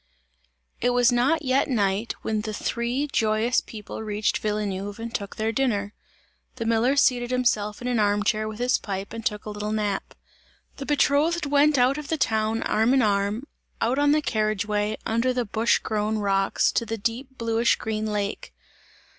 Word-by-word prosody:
It 245 Hz, -, +2 dB
was 245 Hz, 0 st, +4 dB
not 275 Hz, +7 st, +2 dB
yet 265 Hz, +1 st, +2 dB
night, 205 Hz, -2 st, 0 dB
when 215 Hz, -1 st, -1 dB
the 215 Hz, -1 st, -4 dB
three 240 Hz, +7 st, -1 dB
joyous 220 Hz, +2 st, +2 dB
people 215 Hz, 0 st, -8 dB
reached 210 Hz, -1 st, -1 dB
Villeneuve 205 Hz, -1 st, -3 dB
and 230 Hz, 0 st, -6 dB
took 200 Hz, -1 st, -4 dB
their 220 Hz, +1 st, -1 dB
dinner. 210 Hz, -5 st, 0 dB, 0.6 s
The 230 Hz, -3 st, -4 dB
miller 230 Hz, +4 st, +2 dB
seated 245 Hz, -3 st, +3 dB
himself 235 Hz, -4 st, 0 dB
in -, -, -3 dB
an 245 Hz, -2 st, +1 dB
arm 205 Hz, 0 st, +2 dB
chair 215 Hz, +1 st, 0 dB
with 215 Hz, -1 st, -6 dB
his 245 Hz, +2 st, +1 dB
pipe 195 Hz, 0 st, -5 dB
and 230 Hz, 0 st, -6 dB
took 210 Hz, -1 st, -2 dB
a 210 Hz, -, -5 dB
little 210 Hz, 0 st, -4 dB
nap. 210 Hz, -2 st, -2 dB, 0.6 s
The 275 Hz, -, -7 dB
betrothed 295 Hz, +3 st, +2 dB
went 290 Hz, +1 st, +3 dB
out 255 Hz, +4 st, +3 dB
of 300 Hz, -, -7 dB
the 320 Hz, -, -1 dB
town 220 Hz, -3 st, 0 dB
arm 225 Hz, +5 st, +2 dB
in 265 Hz, -, +4 dB
arm, 205 Hz, +2 st, 0 dB, 0.4 s
out 250 Hz, +4 st, +1 dB
on 290 Hz, 0 st, +4 dB
the 300 Hz, 0 st, +2 dB
carriage 215 Hz, -4 st, 0 dB
way, 210 Hz, 0 st, -1 dB
under 230 Hz, +3 st, +1 dB
the 250 Hz, -1 st, -1 dB
bush 220 Hz, +2 st, +2 dB
grown 215 Hz, 0 st, -1 dB
rocks, 195 Hz, -2 st, +1 dB
to -, -, 0 dB
the 225 Hz, +1 st, -3 dB
deep 250 Hz, +5 st, -4 dB
bluish 230 Hz, 0 st, +2 dB
green 220 Hz, 0 st, -3 dB
lake. 205 Hz, -1 st, -3 dB
225 Hz, 180 wpm, -25 LUFS, 210-250 Hz, 0.6 s, was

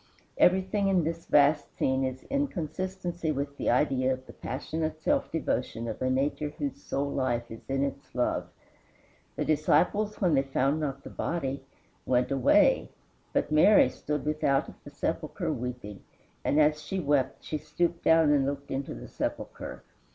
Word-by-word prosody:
Everything 190 Hz, +2 st, +3 dB
in 185 Hz, -3 st, +3 dB
this 165 Hz, +1 st, -4 dB
last 145 Hz, +1 st, +4 dB
scene 130 Hz, 0 st, +1 dB
is 130 Hz, 0 st, -3 dB
in 280 Hz, +1 st, 0 dB
consistency 175 Hz, -, -3 dB
with 140 Hz, 0 st, -3 dB
the -, -, -1 dB
idea 130 Hz, 0 st, +2 dB
of 130 Hz, 0 st, -4 dB
the -, -, -12 dB
passionate 155 Hz, +4 st, -4 dB
self 285 Hz, -, 0 dB
devotion 125 Hz, -7 st, -2 dB
of 110 Hz, -, -5 dB
a 130 Hz, -, +1 dB
nature 140 Hz, +3 st, 0 dB
whose 140 Hz, -3 st, -4 dB
sole 140 Hz, 0 st, -2 dB
life 120 Hz, -4 st, -1 dB
is 115 Hz, -, -11 dB
in 135 Hz, 0 st, +1 dB
its 140 Hz, 0 st, -5 dB
love. 125 Hz, -, 0 dB, 0.9 s
The -, -, -1 dB
disciples, 205 Hz, +7 st, +2 dB
when 180 Hz, -5 st, +2 dB
they 135 Hz, -, +4 dB
found 135 Hz, +2 st, 0 dB
not 140 Hz, -2 st, -3 dB
the -, -, -9 dB
body, 140 Hz, -5 st, -2 dB, 0.5 s
went 125 Hz, +1 st, +2 dB
away; 135 Hz, -2 st, +4 dB, 0.4 s
but -, -, 0 dB
Mary 155 Hz, -1 st, +6 dB
stood 150 Hz, +3 st, -4 dB
without 150 Hz, -2 st, +1 dB
at -, -, -14 dB
the -, -, -10 dB
sepulchre -, -, -2 dB
weeping, 120 Hz, -5 st, -6 dB, 0.4 s
and 145 Hz, -, +2 dB
as 150 Hz, 0 st, +3 dB
she 190 Hz, +5 st, -3 dB
wept 145 Hz, -5 st, 0 dB
she 155 Hz, -, -3 dB
stooped 170 Hz, +3 st, -1 dB
down 160 Hz, -2 st, +5 dB
and 140 Hz, -2 st, +3 dB
looked 140 Hz, 0 st, -4 dB
into 135 Hz, +1 st, -3 dB
the -, -, -9 dB
sepulchre. -, -, -5 dB
145 Hz, 165 wpm, -28 LUFS, 135-165 Hz, 0.9 s, Mary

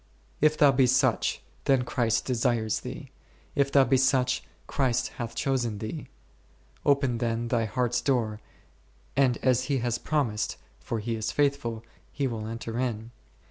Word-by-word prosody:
If 155 Hz, +1 st, +4 dB
thou 145 Hz, -2 st, +6 dB
be 130 Hz, -1 st, +4 dB
such, 130 Hz, -1 st, +2 dB, 0.2 s
then 135 Hz, -2 st, +3 dB
Christ 115 Hz, -2 st, 0 dB
desires 120 Hz, -3 st, +1 dB
thee; -, -, -8 dB, 0.4 s
if 140 Hz, -1 st, +1 dB
thou 140 Hz, -1 st, +6 dB
be 130 Hz, +1 st, +3 dB
such, 130 Hz, -1 st, +2 dB, 0.2 s
Christ 130 Hz, -4 st, 0 dB
hath 115 Hz, -2 st, -4 dB
chosen 125 Hz, -6 st, 0 dB
thee. 110 Hz, +9 st, -6 dB, 0.8 s
Open 140 Hz, -4 st, +2 dB
then 115 Hz, 0 st, -1 dB
thy 115 Hz, -2 st, +1 dB
heart's 120 Hz, +1 st, 0 dB
door, 115 Hz, -6 st, 0 dB, 0.8 s
and 130 Hz, -4 st, +3 dB
as 130 Hz, -1 st, +3 dB
He 140 Hz, -1 st, 0 dB
has 120 Hz, -1 st, -1 dB
promised 130 Hz, -9 st, -1 dB, 0.2 s
(for 115 Hz, -, -4 dB
He 115 Hz, +2 st, -3 dB
is 110 Hz, -1 st, -2 dB
faith 140 Hz, -1 st, +3 dB
ful) 115 Hz, -4 st, -5 dB, 0.3 s
He 140 Hz, -, -2 dB
will 115 Hz, -4 st, -3 dB
enter 115 Hz, +1 st, -5 dB
in. 115 Hz, -2 st, -2 dB
125 Hz, 155 wpm, -27 LUFS, 115-135 Hz, 0.8 s, thou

